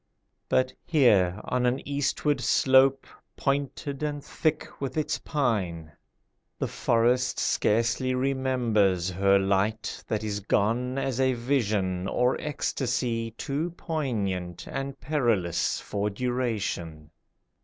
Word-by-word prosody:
But 130 0 +2
here, 105 - +3
on 125 -1 0
an 125 +2 -1
eastward 145 0 0
slope 135 +1 +4 0.3
Pointed 140 0 -2
and 145 -1 -3
thick 155 -1 -2
with 135 +2 -3
its 155 0 0
pine, 95 - -1 0.7
The - - -1
forest 120 +2 +1
scarcely 115 +4 +1
remembers 120 -9 +1
Her 100 +2 +4
light 100 +3 0
that 110 -1 -2
is 105 -1 -2
gone 115 +6 0
as 135 -2 -1
a 130 -1 +3
vision 105 -8 0
Or 125 +4 +2
ecstasy 125 -6 -1
too 160 +5 -3
poignant 100 - -3
And 135 0 -5
perilous 115 - 0
for 105 +1 -2
duration. 105 -10 -3
125 Hz, 110 wpm, -27 LUFS, 100-135 Hz, 0.7 s, slope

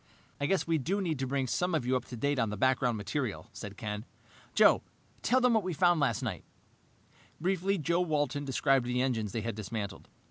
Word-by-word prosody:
"I 145 - 0
guess 195 +2 +1
we 165 -1 +1
do 185 +9 -1
need 165 -7 -1
to 135 - -1
bring 135 0 0
some 180 +7 0
of 145 -6 0
you 130 +1 +2
up 125 - -1
to 125 - -8
date 140 +3 0
on 115 -3 +1
the 105 - -4
background 130 0 +2
material," 110 +3 -3
said 105 -1 -8
Ken. 105 -1 -4 0.5
"Joe, - - +6 0.4
tell 255 - +3
them 250 -1 +4
what 220 - +4
we 185 -2 -3
found 175 +1 +4
last 140 -1 +1
night." 105 -8 -3 1.0
Briefly, 190 +3 +1
Joe 170 +2 +1
Walton 145 -4 0
described 135 -2 +2
the 125 0 0
engines 115 -6 -1
they 115 - -2
had 115 +1 -3
dismantled. 105 -1 -5
135 Hz, 210 wpm, -31 LUFS, 115-170 Hz, 1.0 s, Joe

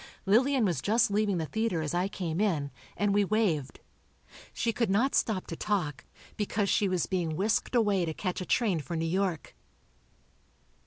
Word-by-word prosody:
Lillian 250 +5 +3
was 170 -9 0
just 225 - +2
leaving 205 -2 +1
the 160 - -1
theatre 220 -1 -1
as 150 - -3
I 180 +2 +1
came 180 -3 -3
in, 155 -9 0 0.3
and 205 -1 +1
we 205 0 +4
waved. 190 -10 0 0.7
She 230 - -1
could 230 -1 0
not 230 +8 +2
stop 205 -5 +1
to 165 - -6
talk, 175 -8 -2 0.3
because 205 -1 -1
she 200 - +2
was 185 -3 0
being 170 -4 -2
whisked 215 +7 0
away 205 -6 +3
to 160 - -3
catch 185 -2 -3
a - - -4
train 205 -9 +2
for 170 +3 -5
New 165 0 -1
York. 180 -1 -2
195 Hz, 175 wpm, -29 LUFS, 170-215 Hz, 0.7 s, we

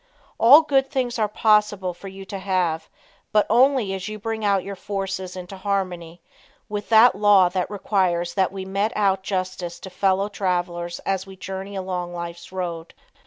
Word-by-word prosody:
All 280 +8 +8
good 270 -3 +2
things 245 -3 -2
are 215 - +2
possible 210 -3 +2
for 175 +3 -11
you 195 0 -9
to 195 0 -6
have, 180 -4 -1 0.4
but 210 -1 +4
only 245 -4 +3
as 190 0 -5
you 215 0 -5
bring 220 +1 -4
your 200 -1 0
forces 190 -1 -4
into 185 +1 -8
harmony 180 -4 -3 0.4
with 210 0 -5
that 230 +2 +7
law 200 -3 +5
that 180 0 -2
requires 185 -4 0
that 190 -2 +1
we 190 -1 -6
mete 200 +4 -1
out 195 -2 +2
justice 185 -3 -4
to 190 - -9
fellow 190 +2 +1
travelers 175 -3 -2
as 195 0 -1
we 190 - -11
journey 190 +1 -7
along 180 -2 -4
life's 170 0 -7
road. 175 -3 -5
190 Hz, 165 wpm, -23 LUFS, 180-205 Hz, 0.4 s, All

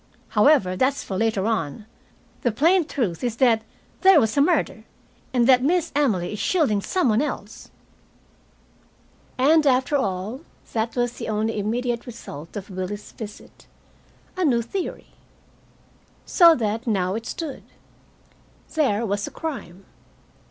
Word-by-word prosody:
However, 210 -5 +4
that's 265 +7 +1
for 190 - -5
later 215 -1 0
on. 215 -2 -2 0.6
The 240 - +1
plain 330 - +3
truth 210 - -2
is, 240 -2 -1
that 235 -3 +3 0.4
there 380 -4 +7
was 220 -4 0
a 280 - +4
murder, 340 +5 +1 0.5
and 245 -2 +2
that 250 0 +6
Miss 335 +4 +1
Emily 215 -11 +1
is 210 - -5
shielding 280 - +1
some 365 - 0
one 220 +3 +3
else." 300 - -5 1.7
And, 300 +4 +4
after 260 +2 +2
all, 205 +1 -2 0.3
that 225 0 -1
was 245 -1 0
the - - -6
only 215 0 -1
immediate 235 +3 -2
result 165 -10 -9
of 200 0 -8
Willie's 190 +3 -5
visit 215 -2 -11 0.7
a 370 - -1
new 240 -7 +2
theory! 370 - -5 1.2
So 335 -3 +6
that 225 -1 -2
now 190 -4 +1
it 225 +2 -5
stood: 315 -5 -5 1.1
there 235 -8 +1
was 205 -1 -2
a - - -8
crime. 205 - -7
235 Hz, 140 wpm, -23 LUFS, 205-280 Hz, 1.7 s, there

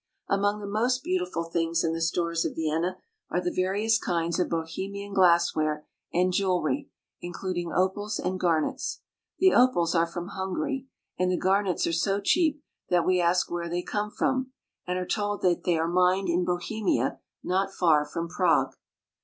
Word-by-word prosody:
Among 205 +1 +1
the 205 - -6
most 235 +6 0
beautiful 360 - -1
things 165 0 0
in 165 - 0
the 165 - -3
stores 170 0 0
of - - -3
Vienna 160 +3 -1 0.3
are - - 0
the 180 0 -2
various 205 +4 +1
kinds 170 -2 -1
of 180 - +1
Bohemian 195 +5 -4
glassware 170 -5 +3 0.3
and 180 +1 +2
jewelry, 195 +10 0 0.3
including 175 -1 -4
opals 205 +3 0
and 185 +1 -2
garnets. 165 -4 0 0.4
The 375 0 +5
opals 245 -10 +4
are 165 -1 +3
from 175 +2 -6
Hungary; 265 +9 -3 0.3
and 185 0 +2
the 180 - +1
garnets 195 -1 +1
are 170 - -1
so 195 +4 +1
cheap 300 - +2 0.3
that 175 -1 +3
we 185 -1 +3
ask 175 +1 +2
where 170 0 -3
they 175 +1 -2
come 210 0 -2
from, 260 +3 -1 0.4
and 180 0 -1
are 180 - -2
told 205 +2 -2
that 175 -2 +2
they 175 -2 +2
are 160 +1 0
mined 180 +2 +2
in 175 +1 +1
Bohe 180 +5 -2
mia, 190 - +1 0.2
not 195 +2 0
far 160 -6 +3
from 165 +3 -4
Prague. 170 - +2
180 Hz, 170 wpm, -27 LUFS, 170-205 Hz, 0.4 s, The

